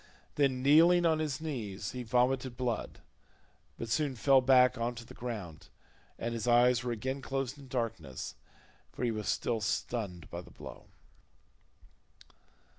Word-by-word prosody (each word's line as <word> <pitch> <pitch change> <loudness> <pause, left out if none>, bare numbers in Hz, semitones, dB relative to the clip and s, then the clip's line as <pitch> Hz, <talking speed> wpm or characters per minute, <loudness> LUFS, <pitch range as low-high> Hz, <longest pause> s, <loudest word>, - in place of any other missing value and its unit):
Then 130 -3 +1
kneeling 170 +5 +6
on 160 -1 +3
his 150 -4 -2
knees 110 -11 -4
he 125 - -5
vomited 125 +1 +1
blood, 120 -4 -3 0.8
but 115 - -5
soon 140 +3 0
fell 135 +3 +5
back 130 -1 +5
on 120 0 -2
to 120 0 -9
the - - -12
ground, 105 -11 -6 0.5
and 115 0 -3
his 115 0 -3
eyes 120 +1 +5
were 125 - -2
again 130 +4 -3
closed 135 +1 -3
in 140 - -12
darkness 115 - -4 0.6
for - - -6
he 120 - +2
was 105 -3 -4
still 115 +4 0
stunned 95 -5 -2
by 85 - -5
the - - -15
blow. - - -11
125 Hz, 150 wpm, -31 LUFS, 115-135 Hz, 0.8 s, kneeling